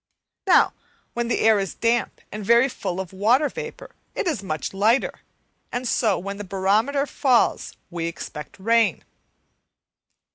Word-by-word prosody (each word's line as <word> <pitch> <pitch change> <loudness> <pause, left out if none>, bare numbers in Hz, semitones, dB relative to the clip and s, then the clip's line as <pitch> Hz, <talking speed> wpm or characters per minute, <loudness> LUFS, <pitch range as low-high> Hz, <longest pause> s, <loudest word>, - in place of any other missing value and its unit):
Now, - - +5 0.4
when 240 0 -2
the 235 - 0
air 220 -2 +5
is 195 -1 -3
damp 235 +1 0
and 210 0 -6
very 235 +5 +5
full 185 -8 -4
of 190 -1 -6
water 240 +10 +3
vapour 485 +1 -8 0.2
it - - -1
is 305 - -1
much 160 -3 -4
lighter, 220 +7 +1 0.5
and 245 +1 -3
so 220 -4 +2
when 200 +2 -5
the 205 - -5
barometer 205 +9 +1
falls 260 -3 +1 0.2
we 170 -1 -3
expect 150 -3 -8
rain. 225 -2 +2
220 Hz, 145 wpm, -23 LUFS, 195-245 Hz, 0.5 s, Now